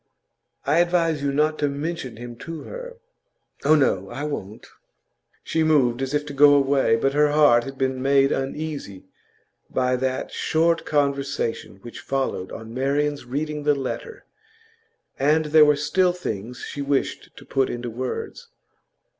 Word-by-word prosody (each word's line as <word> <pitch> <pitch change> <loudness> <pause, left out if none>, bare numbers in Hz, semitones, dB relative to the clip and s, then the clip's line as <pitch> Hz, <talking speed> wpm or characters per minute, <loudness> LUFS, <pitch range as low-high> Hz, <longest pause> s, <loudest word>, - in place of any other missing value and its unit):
I 150 +4 +3
advise 170 -3 +2
you 140 0 0
not 155 +2 +1
to 145 - +1
mention 140 -4 -4
him 120 0 -8
to 165 +4 -7
her.' - - -8 0.7
'Oh 155 +2 +5
no, 100 -10 +1
I 135 +4 -5
won't.' 110 -9 -5 0.8
She 160 - -1
moved 135 -6 +3
as 135 +2 -2
if 150 0 0
to 145 - -7
go 145 +1 +7
away, 135 -4 +3
but 135 +4 0
her 150 +1 +4
heart 145 -6 +4
had 135 0 -8
been 130 -1 -1
made 135 0 +3
uneasy 135 -8 -4 0.6
by 130 0 +1
that 130 0 -2
short 165 +1 +1
conversation 140 -6 -1
which 120 - -9
followed 135 -9 -2
on 110 0 -8
Marian's 140 +2 -1
reading 150 +4 -3
the 145 0 +2
letter, 140 - -6 0.9
and 155 +3 +3
there 150 0 +6
were 150 0 +4
still 175 +5 +1
things 125 - -5
she 145 - -5
wished 140 -1 -2
to - - -12
put 135 -1 0
into 120 0 -4
words. 125 +3 -5
140 Hz, 155 wpm, -23 LUFS, 130-150 Hz, 0.9 s, go